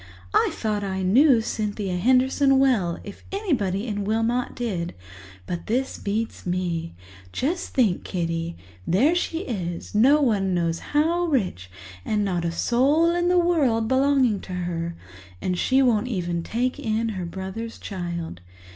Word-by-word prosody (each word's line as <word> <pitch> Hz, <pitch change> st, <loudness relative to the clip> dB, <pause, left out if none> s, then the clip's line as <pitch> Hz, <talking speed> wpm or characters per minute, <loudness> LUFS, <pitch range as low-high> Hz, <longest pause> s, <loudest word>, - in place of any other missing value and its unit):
I -, -, +4 dB
thought 210 Hz, -2 st, -2 dB
I 190 Hz, -1 st, -2 dB
knew 245 Hz, +6 st, +5 dB
Cynthia 210 Hz, -4 st, -2 dB
Henderson 260 Hz, +6 st, +3 dB
well, 230 Hz, -11 st, +2 dB
if 200 Hz, -, -10 dB
anybody 245 Hz, -, -1 dB
in 205 Hz, -3 st, -2 dB
Wilmot 225 Hz, +4 st, 0 dB
did, 185 Hz, -8 st, -3 dB, 0.5 s
but 170 Hz, -, -5 dB
this 255 Hz, +4 st, -1 dB
beats 220 Hz, +3 st, -3 dB
me. 175 Hz, -, -2 dB, 0.4 s
Just 325 Hz, -, -2 dB
think, 220 Hz, -9 st, +2 dB
Kitty—there 165 Hz, -, -1 dB
she 345 Hz, -1 st, -1 dB
is, 180 Hz, -, -5 dB
no 260 Hz, +8 st, +5 dB
one 200 Hz, -9 st, +1 dB
knows 170 Hz, -1 st, 0 dB
how 330 Hz, +4 st, +1 dB
rich, 190 Hz, -, -1 dB, 0.3 s
and 210 Hz, -1 st, 0 dB
not 180 Hz, -3 st, -1 dB
a 170 Hz, -, 0 dB
soul 280 Hz, -, +3 dB
in 350 Hz, 0 st, +1 dB
the 360 Hz, -, +4 dB
world 285 Hz, -11 st, +2 dB
belonging 260 Hz, -4 st, +3 dB
to 185 Hz, -, -8 dB
her, 170 Hz, -2 st, -3 dB, 0.4 s
and 180 Hz, -, -1 dB
she 265 Hz, +1 st, +3 dB
won't 235 Hz, -2 st, +2 dB
even 175 Hz, -7 st, -2 dB
take 245 Hz, +8 st, -2 dB
in 225 Hz, 0 st, -1 dB
her 185 Hz, -5 st, -4 dB
brother's 190 Hz, +6 st, -6 dB
child. 170 Hz, -, -5 dB
215 Hz, 145 wpm, -24 LUFS, 180-260 Hz, 0.5 s, knew